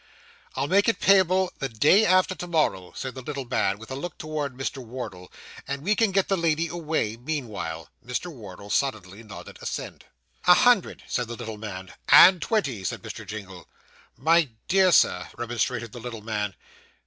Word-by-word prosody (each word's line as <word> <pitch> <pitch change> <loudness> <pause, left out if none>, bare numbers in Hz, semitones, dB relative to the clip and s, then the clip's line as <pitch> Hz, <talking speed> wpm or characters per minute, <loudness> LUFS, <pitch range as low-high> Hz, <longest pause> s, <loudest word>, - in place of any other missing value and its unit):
'I'll - - 0
make 200 +6 +3
it 230 - 0
payable 190 -1 +4
the 135 - -2
day 145 - +4
after 185 0 +4
to 180 - -7
morrow,' 125 - 0
said 130 -1 -5
the 130 - -8
little 140 0 -5
man, 100 -5 0
with 110 +4 -12
a - - -3
look 160 +4 -6
towards 150 -4 -4
Mr. 135 0 -4
Wardle; 110 -7 -8 0.4
'and 140 +1 -4
we 210 +5 +2
can 225 -3 +2
get 195 0 +2
the 195 - +2
lady 165 -2 +1
away, 160 -10 -2
meanwhile.' 110 - -5 0.2
Mr. 125 +9 -4
Wardle 100 -4 -10
sullenly 110 -7 -1
nodded 110 -3 -11
assent. - - -6 0.4
'A 180 - +9
hundred,' 245 -4 +3
said 125 -2 -2
the 120 - -6
little 110 -3 -7
man. 95 -3 -7 0.2
'And 185 -2 +8
twenty,' 145 - -1
said - - -4
Mr. - - -8
Jingle. 95 -4 -8 0.5
'My 165 -2 +3 0.2
dear 190 -1 +4
Sir,' 90 - +3
remonstrated 120 -1 -2
the 120 - -9
little 115 -2 -7
man. 105 -3 -3
130 Hz, 175 wpm, -25 LUFS, 110-170 Hz, 0.5 s, A